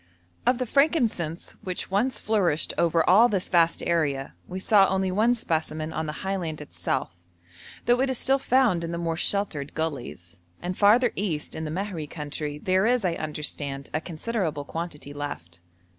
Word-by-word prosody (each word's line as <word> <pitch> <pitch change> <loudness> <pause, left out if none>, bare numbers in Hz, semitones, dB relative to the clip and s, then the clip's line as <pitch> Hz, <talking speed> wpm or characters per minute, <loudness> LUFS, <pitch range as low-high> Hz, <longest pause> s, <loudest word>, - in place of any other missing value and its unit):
Of 250 - +4
the 255 - -1
frankincense 235 - +1
which 185 0 -4
once 235 +7 +1
flourished 190 -8 +1
over 165 -1 +2
all 215 +7 +7
this 195 -4 -1
vast 170 -2 +3
area, 145 -5 0
we 185 - -5
saw 195 0 +5
only 190 0 0
one 220 +6 +3
specimen 160 -6 -2
on 160 0 -2
the - - -2
highland 180 -5 -2
itself, 150 - -2 0.7
though 245 +1 +4
it 270 - +2
is 260 - 0
still 270 +2 +2
found 245 -10 +3
in 165 - -3
the 170 - -3
more 165 -1 -1
sheltered 170 -6 -1
gullies; 125 - -4 0.2
and 180 +1 -4
farther 220 +5 +5
east, 170 -7 -2
in 160 - -4
the - - -3
Mahri 180 -3 -3
country, 150 -1 -4
there 185 +6 +2
is, 245 -4 +2
I 175 - +2
understand, 150 -3 -4
a 155 - 0
considerable 170 -4 -3
quantity 155 -3 -6
left. 90 - -7
170 Hz, 170 wpm, -26 LUFS, 155-210 Hz, 0.7 s, all